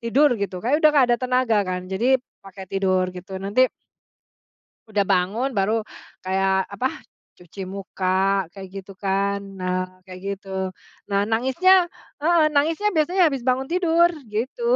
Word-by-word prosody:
tidur, 255 +4 +3
gitu. 195 -2 -3
Kayak 290 +6 +2
udah 310 - +7
nggak 275 -4 +5
ada - - +3
tenaga, 255 -3 +1
kan. 180 0 -3
Jadi, 245 +7 +3 0.2
pakai 195 0 -10
tidur, 185 -1 0
gitu. 185 +1 -8
Nanti 205 +7 +2 1.2
Udah 210 -1 +1
bangun. 195 +8 +1
Baru, 215 +3 +2 0.4
kayak, 190 0 0
apa, 250 +6 0 0.5
cuci 180 +2 -11
muka, 195 -1 -6 0.5
kayak 195 -1 -9
gitu 195 0 -8
kan. 200 +1 +1 0.2
Nah, 185 0 -1 0.3
kayak 185 0 -9 0.2
gitu, 195 - -21 0.6
nah, 200 0 +2
nangisnya 265 +11 +3 0.5
heeh, 335 0 +4
nangisnya 320 +8 +2
biasanya 355 +5 +2
habis 275 -4 -2
bangun 260 +1 +1
tidur, 345 -1 +4 0.2
gitu. 255 - -3
210 Hz, 140 wpm, -23 LUFS, 190-265 Hz, 1.2 s, udah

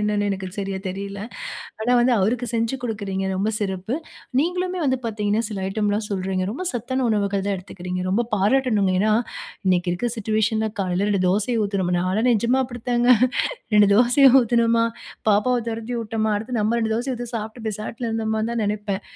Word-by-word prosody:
என்னனு 210 -1 +1
எனக்கு 190 -1 -3
சரியா 195 -1 -3
தெரியல. 195 +1 -5 0.6
ஆனா 230 +3 0
வந்து 245 +1 +3
அவருக்கு 235 +6 +1
செஞ்சு 230 +2 0
குடுக்கிறீங்க 200 -4 -3
ரொம்ப 195 +3 0
சிறப்பு. 195 +4 -2 0.4
நீங்களுமே 360 +3 -1
வந்து 260 -1 +2
பார்த்தீங்கனா 210 -1 0
சில 210 - -5
ஐட்டம்லாம் 210 +1 0
சொல்றீங்க. 190 -1 -1
ரொம்ப 280 - -5
சத்தான 260 +2 -2
உணவுகள் 200 -2 0
தான் 200 - 0
எடுத்துக்கிறீங்க. 180 0 -5
ரொம்ப 225 +5 +2
பாராட்டனுங்க. 210 -2 +2
ஏனா 215 +2 +3 0.6
இன்றைக்கு 180 -1 +2
இருக்கிற 235 +8 -1
சிட்யூவேஷன் 220 +1 +1
ல, - - -1
காலையில 185 +1 0
2 195 -2 +1
தோசைய 215 +5 +1
ஊத்தினோமா, 195 -3 -1
நாலாம் 190 +7 +1
நிஜமா 235 +4 +2
அப்படி 245 -2 -9
தாங்க. 240 +1 +3 0.7
2 205 -1 +6
தோசைய 250 +4 +6
ஊத்தினோமா, 230 -1 +3 0.4
பாப்பாவ 245 +5 +3
துரத்தி 230 +2 -4
விட்டோமா 220 -1 -1
அடுத்து 230 +3 -4
நம்ம 215 +2 +1
2 220 -1 0
தோசைய 250 +2 -2
ஊத்தி 240 -1 -5
சாப்ட்டு 220 +1 -6
பேசாட்ல 220 +3 -4
இருந்தோமானு 220 0 -1
தான் 230 -2 0
நெனைப்பேன். 205 -1 -2
215 Hz, 165 wpm, -23 LUFS, 200-235 Hz, 0.7 s, 2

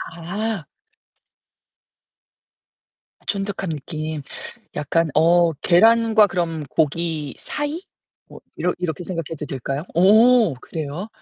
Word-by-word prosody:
아. 195 +1 -4 2.6
쫀득한 195 -2 -2
느낌. 155 0 -5 0.5
약간 160 +3 +1
어 170 +1 +4
계란과 220 +6 +4
그럼 170 -4 -2
고기 160 -1 -1
사이? 295 +4 -4 0.5
뭐 - - -13 0.2
이러 180 - 0
이렇게 175 -1 -3
생각해도 165 -4 -4
될까요? 135 +2 -4
오 215 - +5
그래요? 155 - -6
170 Hz, 185 characters per minute, -21 LUFS, 155-205 Hz, 2.6 s, 오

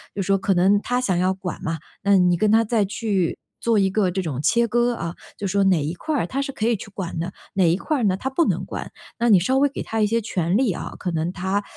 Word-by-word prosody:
就 195 - -1
是 - - -3
说 195 0 +3
可 195 +1 +1
能 195 +3 +3
他 245 0 -1
想 190 -8 0
要 185 +2 +2
管 185 -1 -6
嘛， 160 0 -2 0.2
那 200 0 +5
你 180 -1 +3
跟 215 +3 +2
他 225 +1 +5
再 215 -2 +1
去， 200 -4 -1 0.2
做 230 -2 +2
一 195 -1 +3
个 190 -2 +1
这 190 +1 -1
种 150 -7 -4
切 235 +8 +3
割 240 +2 +2
啊， 170 -6 -5 0.2
就 200 - -3
是 - - -2
说 200 0 +2
哪 180 -6 +3
一 150 - -2
块 310 - -3
儿 205 -12 0
他 270 - -3
是 275 - -3
可 220 -4 -2
以 235 - +3
去 200 - -10
管 175 -4 -5
的， 180 +3 -4 0.2
哪 180 -4 +4
一 170 - +3
块 300 - -1
儿 245 - -1
呢 195 -3 +2
他 260 +7 -3
不 295 +5 +2
能 - - 0
管。 - - -6 0.3
那 235 0 +1
你 200 -4 +7
稍 260 +10 +1
微 285 - +4
给 - - -6
他 225 - -3
一 210 - +4
些 230 +2 +1
权 180 -3 -1
利 250 -6 +2
啊， - - -6
可 185 - -3
能 165 +2 -1
他， 190 +2 -1
200 Hz, 310 characters per minute, -23 LUFS, 180-230 Hz, 0.3 s, 你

